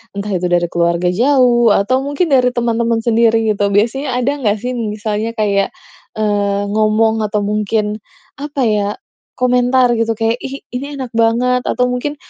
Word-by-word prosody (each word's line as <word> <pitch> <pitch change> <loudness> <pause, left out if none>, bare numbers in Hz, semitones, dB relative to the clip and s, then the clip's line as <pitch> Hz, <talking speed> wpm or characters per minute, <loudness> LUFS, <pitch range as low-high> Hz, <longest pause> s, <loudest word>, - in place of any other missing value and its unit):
Entah 200 +1 -4
itu 180 0 -1
dari 175 -1 +1
keluarga 170 +1 +1
jauh 240 +1 +3
atau 250 +7 +1
mungkin 290 +5 -1
dari 250 -2 +4
teman-teman 235 -1 0
sendiri, 225 -1 +2
gitu, 205 -1 0
biasanya 250 +5 0
ada 250 +3 +1
enggak 215 -5 0
sih, 250 - -2
misalnya 215 0 -3
kayak, 200 -3 0 0.4
eee, 205 -2 0
ngomong 220 +1 +2
atau 210 0 -1
mungkin, 210 +1 -1 0.4
apa 290 -1 -4
ya, 210 -2 +1 0.5
komentar, 250 0 +2
gitu, 230 0 +1
kayak, 225 +2 -1
"Ih, 275 +1 -7
ini 280 +3 -5
enak 260 -3 -6
banget," 240 +2 +1
atau 250 0 0
mungkin, 270 +4 -3
225 Hz, 155 wpm, -16 LUFS, 210-250 Hz, 0.5 s, dari